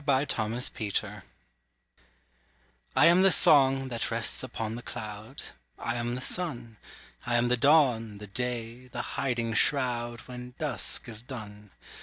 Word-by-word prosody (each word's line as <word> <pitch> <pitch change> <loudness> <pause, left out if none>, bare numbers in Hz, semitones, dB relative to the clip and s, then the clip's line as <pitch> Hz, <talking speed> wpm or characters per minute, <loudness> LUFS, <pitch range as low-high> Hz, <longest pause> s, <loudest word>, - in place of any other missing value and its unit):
I 135 0 +3
AM 110 -1 -1
THE 125 +2 +1
WORLD 105 -3 -2 1.7
I 140 - +6
am 175 +2 +6
the 195 0 +6
song, 135 -4 +5
that 120 -2 -3
rests 115 0 +1
upon 115 -3 -4
the 120 - -6
cloud; 110 +3 -7 0.3
I - - -2
am 120 0 -2
the 125 - -4
sun: 125 -9 -3 0.5
I 120 - +1
am 120 +1 +3
the 125 - +4
dawn, 125 -7 +3
the 105 - -8
day, 120 +2 -4
the 125 -1 -4
hiding 120 -4 -1
shroud, 120 -2 +2
When 125 0 -9
dusk 145 -5 -2
is 110 -2 -4
done. 105 -5 -9
120 Hz, 150 wpm, -29 LUFS, 115-130 Hz, 1.7 s, I